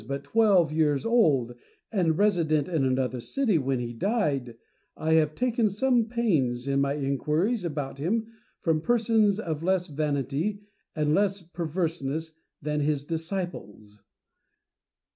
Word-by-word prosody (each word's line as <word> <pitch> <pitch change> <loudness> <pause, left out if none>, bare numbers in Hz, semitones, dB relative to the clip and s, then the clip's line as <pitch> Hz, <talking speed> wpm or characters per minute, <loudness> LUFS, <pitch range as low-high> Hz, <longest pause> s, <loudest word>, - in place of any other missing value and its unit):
but 140 +1 -4
twelve 190 -1 +3
years 150 -1 +1
old 150 - +3 0.4
and 170 -7 +1
resident 165 -8 +2
in 160 -6 0
another 130 -1 0
city 220 - 0
when 135 -2 -1
he 120 -1 -4
died, 140 - -1 0.4
I 160 +1 0
have 155 -1 +3
taken 240 -3 +1
some 240 +3 +2
pains 155 - 0
in 140 0 +1
my 140 0 +1
inquiries 150 - 0
about 145 -5 -4
him 220 +9 0 0.4
from 160 -2 +1
persons 220 -1 +2
of 160 -7 -3
less 185 +1 +1
vanity 150 +6 -2 0.3
and 150 -1 +1
less 195 0 +1
perverseness 160 -2 -3 0.3
than 150 0 -2
his 145 -1 0
disciples. 160 - -5
160 Hz, 130 wpm, -27 LUFS, 140-200 Hz, 0.4 s, twelve